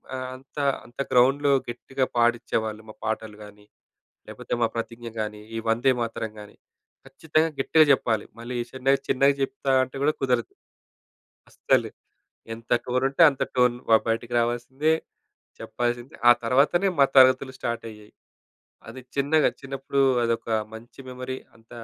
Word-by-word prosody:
ఆహ్, 130 0 -4
అంత, 135 +3 -18 0.3
అంత 120 +3 -19
గ్రౌండ్‌లో 135 +3 +4 0.2
గట్టిగా 130 +2 -2
పాడిచ్చేవాళ్ళు. 115 -2 0
మా 110 - -9
పాటలు 110 -1 -4
గాని, 105 0 -15 0.6
లేపోతే - - -9
మా - - +5
ప్రతిజ్ఞ 115 +1 -5
గాని, 105 0 -4 0.2
ఈ - - -2
వందేమాతరం 115 -2 0
గాని, 105 - -13 0.5
ఖచ్చితంగా 155 +4 0
గట్టిగా 155 +3 +5
చెప్పాలి. 110 -5 0 0.2
మళ్ళీ 120 +1 -6 0.2
చిన్న 130 0 -4 0.2
చిన్నగా 140 +2 +3
జెప్తా 135 -1 -1
అంటే 130 +1 -12
కూడా 150 +2 +3
కుదరదు. 125 -3 +1 1.1
అస్సలు. - - +1 0.6
ఎంత 115 0 -13
టోనుంటే 135 +5 0
అంత 140 - -8
టోన్ 125 -1 +3
బ - - +2 0.2
బయటికి 115 +1 -2
రావాల్సిందే. 120 +6 0 0.7
చెప్పాల్సిందే. 120 +2 -3
ఆ - - +11
తర్వాతనే 145 +10 +3
మా 140 - +7
తరగతులు 130 0 +5
స్టార్ట్ 120 -2 -3
అయ్యేయి. 105 -1 -15 0.8
అది 130 - -9
చిన్నగా 145 +2 +3
చిన్నప్పుడు 135 0 -3 0.2
అదొక 115 0 -2 0.3
మంచి 115 +4 -12
మెమరీ. 130 +1 -6 0.2
అంత 115 0 -26
125 Hz, 130 wpm, -25 LUFS, 115-135 Hz, 1.1 s, ఆ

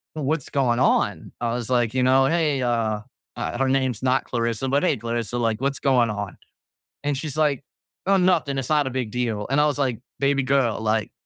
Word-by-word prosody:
"What's 150 -1 -2
going 125 -4 +1
on?" 130 - +1
I 115 -1 0
was, 120 -1 -4
like, 120 -3 +1
you 130 -1 +1
know, 130 +1 +5
"Hey," 150 -3 +1
uh, 115 -3 0 0.3
uh, - - -3
her 135 0 +1
name's 130 -4 0
not 130 0 +2
Clarissa, 115 +1 -1
but 140 +2 +2
"Hey, 185 - +2
Clarissa, 115 0 -3
like, 115 -1 0
what's 140 +1 -1
going 125 -4 +3
on?" 100 -2 -5 0.7
And 145 -1 0
she's, 150 +1 -5
like, 145 -4 +1 0.4
"Oh, 195 +1 +4
nothing, 175 -7 +2
it's 130 -2 -3
not 150 -3 +2
a - - -1
big 125 -4 -3
deal." 115 -4 -2
And 135 - +2
I - - +4
was, 145 - -1
like, 130 -5 0 0.2
"Baby 140 0 +2
girl," 130 -4 +1
like 110 -1 0
130 Hz, 210 wpm, -23 LUFS, 115-140 Hz, 0.7 s, know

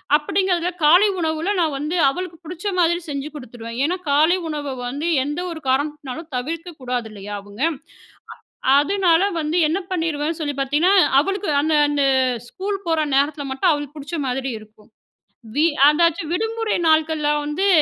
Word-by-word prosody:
அப்படிங்கிறதில 355 +3 +1
காலை 355 +8 +6
உணவில 320 +4 -1
நான் 315 -4 +1
வந்து 300 +5 -3
அவளுக்கு 350 +2 -5
புடிச்ச 350 +3 -8
மாதிரி 345 0 +3
செஞ்சு 280 0 -4
குடுத்துருவேன். 235 -3 -8
ஏன்னா 355 +3 0
காலை 310 +5 +4
உணவ 290 -3 -4
வந்து 285 +6 -3 0.2
எந்த 295 +4 -3
ஒரு 320 -2 -7
காரணத்துனாலும் 290 +2 -2
தவிர்க்க 330 +7 -4
கூடாது 245 -3 -3
இல்லையா 205 0 -8
அவுங்க? 205 +5 -12 1.1
அ - - +6
அதுனால 370 +1 +2
வந்து 315 +2 -1
என்ன 330 +5 0
பண்ணிருவேன் 325 -2 -1
சொல்லி 290 -2 -2
பார்த்தீங்கன்னா, 300 +8 +2 0.3
அவளுக்கு 390 0 -2
அந்த 310 +1 +1
அந்த 290 -1 +1 0.4
ஸ்கூல் 395 +1 -4
போற 325 -1 +1 0.2
நேரத்தில 285 +1 +1
மட்டும் 265 +4 +2
அவளுக்கு 290 0 -4
புடிச்ச 300 +3 -5
மாதிரி 260 +1 -2
இருக்கும். 215 0 -19 0.7
வி 315 +3 +4 0.2
அதாச்சு 335 +1 +2
விடுமுறை 450 +3 -1
நாட்கள்ல 315 -1 +2
வந்து, 345 +7 0
310 Hz, 150 wpm, -21 LUFS, 280-345 Hz, 1.1 s, காலை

